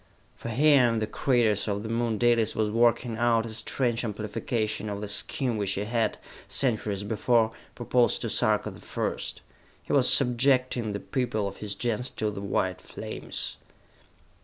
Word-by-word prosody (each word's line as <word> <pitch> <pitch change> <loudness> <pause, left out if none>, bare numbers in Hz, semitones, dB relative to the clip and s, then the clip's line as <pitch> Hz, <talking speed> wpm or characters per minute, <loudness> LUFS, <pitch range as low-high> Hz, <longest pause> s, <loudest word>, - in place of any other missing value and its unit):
For - - -7
here 140 +1 +5
in 115 - 0
the 110 - 0
craters 115 -4 +1
of 100 0 -2
the 110 - -5
Moon 115 -1 0
Dalis 115 -1 +2
was 110 -1 0
working 115 0 +2
out 115 -1 +2
a - - -6
strange 115 +2 -2
amplification 110 0 -3
of 100 -1 -4
the 105 - -5
scheme 120 +3 -1
which 100 -2 -1
he 100 - -2
had, 115 0 -1 0.3
centuries 110 -6 0
before, 110 +2 +2 0.2
proposed 120 0 +1
to - - -2
Sarka - - +1
the - - -13
First. - - -4 0.4
He - - -4
was - - +7
subjecting 125 -2 +3
the 100 - -3
people 115 -5 -2
of 100 - -7
his 105 -1 -5
Gens 120 +3 -1
to 105 -1 -1
the 100 - -7
white 95 -2 -1
flames. - - -6
115 Hz, 165 wpm, -27 LUFS, 105-120 Hz, 0.4 s, was